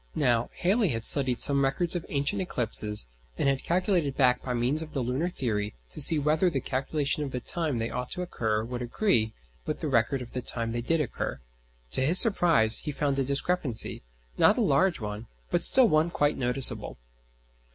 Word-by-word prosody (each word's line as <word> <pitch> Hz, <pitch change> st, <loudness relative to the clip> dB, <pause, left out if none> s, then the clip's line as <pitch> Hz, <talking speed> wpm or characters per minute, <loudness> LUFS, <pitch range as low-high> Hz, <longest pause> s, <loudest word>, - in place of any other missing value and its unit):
Now, 120 Hz, -4 st, 0 dB
Halley 200 Hz, +4 st, +2 dB
had 115 Hz, -7 st, -3 dB
studied 130 Hz, -4 st, +3 dB
some 140 Hz, -1 st, +5 dB
records 165 Hz, +6 st, 0 dB
of 175 Hz, -, -5 dB
ancient 145 Hz, +8 st, -1 dB
eclipses, 110 Hz, -, +1 dB, 0.3 s
and -, -, 0 dB
had 135 Hz, -1 st, 0 dB
calculated 175 Hz, -5 st, -1 dB
back 125 Hz, -2 st, +2 dB
by 125 Hz, -1 st, -4 dB
means 125 Hz, +6 st, 0 dB
of 160 Hz, -1 st, -9 dB
the 135 Hz, -, -2 dB
lunar 130 Hz, +8 st, -2 dB
theory 105 Hz, -, -3 dB, 0.2 s
to -, -, -7 dB
see 160 Hz, -, +6 dB
whether 155 Hz, +5 st, +1 dB
the 140 Hz, -, -2 dB
calculation 140 Hz, +4 st, -2 dB
of 140 Hz, -, -5 dB
the 125 Hz, -, -5 dB
time 155 Hz, +1 st, -2 dB
they 115 Hz, 0 st, -3 dB
ought 125 Hz, 0 st, -5 dB
to 180 Hz, -, -4 dB
occur 110 Hz, -10 st, -2 dB
would 120 Hz, +1 st, -6 dB
agree 120 Hz, -, 0 dB, 0.3 s
with -, -, -3 dB
the -, -, -4 dB
record 125 Hz, +1 st, 0 dB
of 120 Hz, -, -14 dB
the 125 Hz, -, -4 dB
time 115 Hz, -1 st, -3 dB
they 120 Hz, +1 st, -3 dB
did 165 Hz, +6 st, 0 dB
occur. 135 Hz, -, -5 dB, 0.5 s
To -, -, +1 dB
his 160 Hz, +8 st, +6 dB
surprise 165 Hz, -, +4 dB
he 150 Hz, -, -5 dB
found 140 Hz, -1 st, -2 dB
a -, -, +1 dB
discrepancy, 140 Hz, -2 st, 0 dB, 0.4 s
not 210 Hz, -, +4 dB
a -, -, +1 dB
large 180 Hz, -1 st, +1 dB
one, 105 Hz, +1 st, -7 dB, 0.2 s
but -, -, 0 dB
still 260 Hz, -2 st, +6 dB
one 155 Hz, -2 st, +1 dB
quite 145 Hz, -3 st, 0 dB
noticeable. 125 Hz, +1 st, +1 dB
135 Hz, 195 wpm, -26 LUFS, 120-165 Hz, 0.5 s, see